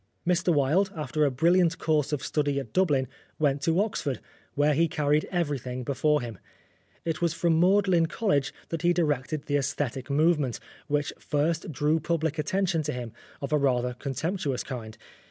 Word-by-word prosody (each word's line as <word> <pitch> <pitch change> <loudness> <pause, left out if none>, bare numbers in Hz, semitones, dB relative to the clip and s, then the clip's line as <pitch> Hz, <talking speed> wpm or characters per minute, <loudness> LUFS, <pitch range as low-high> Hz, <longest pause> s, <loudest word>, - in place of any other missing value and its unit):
Mr 180 0 +2
Wilde, 160 +7 +2
after 150 0 0
a - - +3
brilliant 165 +5 +3
course 155 -3 +1
of 150 - -2
study 145 -2 0
at 135 - -8
Dublin, 145 -8 +2 0.3
went 145 -2 +1
to 165 +4 +2
Oxford, 165 - -1 0.4
where 145 +1 +3
he 165 +4 +3
carried 150 -1 +1
everything 140 -8 -2
before 145 +4 +1
him. 115 -5 -7 0.7
It 165 -1 -2
was 170 -1 +1
from 170 -2 +2
Magdalen 185 -2 +4
College 160 -8 0 0.2
that 165 -2 -3
he 175 0 +3
directed 150 -3 0
the 145 - +1
aesthetic 135 -1 -2
movement, 150 -3 +2 0.3
which 145 0 0
first 160 +2 -1
drew 150 +3 +1
public 160 -1 -1
attention 175 +1 0
to 150 0 -2
him, 120 -3 -6 0.3
of 140 +2 -3
a 150 - +4
rather 125 -3 +1
contemptuous 140 +2 -2
kind. 110 -4 -7
150 Hz, 165 wpm, -27 LUFS, 140-170 Hz, 0.7 s, Magdalen